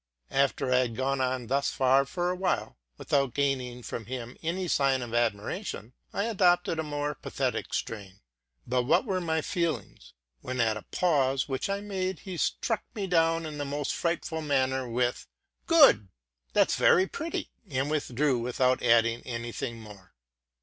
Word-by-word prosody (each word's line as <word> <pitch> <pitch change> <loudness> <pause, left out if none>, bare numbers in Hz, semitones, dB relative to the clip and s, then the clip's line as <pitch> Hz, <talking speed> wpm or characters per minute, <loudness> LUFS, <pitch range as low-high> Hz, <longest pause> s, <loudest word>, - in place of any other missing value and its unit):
After 135 -1 +1
I - - +5
had 120 -3 -1
gone 135 +2 0
on 130 -1 -1
thus 135 +4 +1
for 135 +7 +2
a - - -2
while, 185 - -1 0.2
without 140 -3 0
luring 130 -3 -1
from 115 -2 -6
him 125 -1 -6
any 175 +3 -2
sign 135 -5 +2
of 120 -1 -7
admiration, 120 - -2 0.2
I 200 - -1
adopted 175 -6 +2
a - - 0
more 145 -1 -2
pathetic - - -3
strain; 100 -3 -4 0.5
but 125 +1 +1
what 125 - +2
were 190 -4 -1
my 160 -2 0
feelings, 170 0 -3 0.3
when, 130 - -5
at 110 -2 +2
a 110 - -6
pause 135 -6 +1
which 135 +6 -2
I 200 0 -1
made, 190 -3 -3
he 190 -2 -6
struck 225 +6 0
me 205 -3 -2
down 165 -2 +2
in 150 -1 -6
the - - -1
most 145 0 -2
frightful 170 -1 -2
manner, 130 -3 0
with, 120 +1 -1 0.2
'+ - - -29
Well, 290 - +7 0.5
that's - - +4
very 185 - +5
pretty,'' 320 +11 -4 0.2
and 135 +1 -1
withdrew 140 -3 +1
without 125 +2 +1
adding 115 -1 +3
any 120 -1 -5
thing 115 0 -5
more. 105 -4 -13
135 Hz, 165 wpm, -28 LUFS, 125-170 Hz, 0.5 s, Well